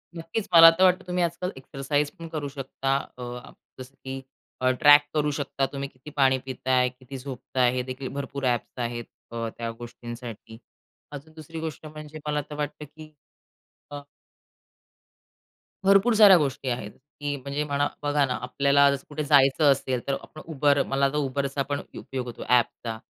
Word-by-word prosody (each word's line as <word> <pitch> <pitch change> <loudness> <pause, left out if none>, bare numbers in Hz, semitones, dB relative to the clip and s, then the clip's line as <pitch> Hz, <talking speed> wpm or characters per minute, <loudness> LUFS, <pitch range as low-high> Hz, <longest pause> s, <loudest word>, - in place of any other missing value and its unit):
नक्कीच, 165 +6 -4
मला 165 -1 +11
तर 180 +3 +1
वाटतं 185 0 +4
तुम्ही 180 0 0
आजकाल 170 +2 -2
एक्सरसाइज 140 +2 -2
पण 165 - -7
करू 150 -3 -4
शकता. 135 0 -2 0.2
अ, 125 0 -8 0.3
जसं, 130 +1 -10
की 135 0 -7 0.4
अ, 130 - +3
ट्रॅक 145 0 +9
करू 150 -1 +1
शकता, 140 -1 -1
तुम्ही 140 0 -4
किती 130 +3 -13
पाणी 135 -3 +3
पिताय, 130 -1 +1
किती 130 +1 -11
झोपताय, 130 -1 -1
हे 125 - -1
देखील 130 +1 -5
भरपूर 140 -1 -4
ॲप्स 125 +1 -1
आहेत 120 0 -4 0.3
अ, 115 -1 -3
त्या 115 -1 -3
गोष्टींसाठी. 120 -2 -9 0.5
अजून 150 +2 -10
दुसरी 160 +1 -9
गोष्ट 160 -1 -6
म्हणजे 155 0 -9
मला 150 0 0
तर 150 - -6
वाटतं, 150 0 -4
की 155 +1 -14 0.8
अ 145 0 -6 1.9
भरपूर 195 +4 +5
साऱ्या 205 -4 +9
गोष्टी 135 -3 -1
आहेत, 115 -4 -3
की 145 +3 -6
म्हणजे 140 +3 -3
म्हणा 145 -1 0 0.2
बघा 145 -1 +2
ना, 125 - -2
आपल्याला 140 +2 +3
जसं 140 -1 -4
कुठे 150 +1 -3
जायचं 140 0 +5
असेल, 130 -2 0
तर 140 - +1
आपण 155 - -12
Uber 140 -1 +3
मला 135 0 +1
आता 140 +2 0
Uberचा 140 +1 -2
पण 145 0 -1 0.2
उपयोग 130 -2 -5
होतो, 120 -2 -7
ॲपचा. 120 -2 +1
140 Hz, 165 wpm, -26 LUFS, 130-150 Hz, 1.9 s, मला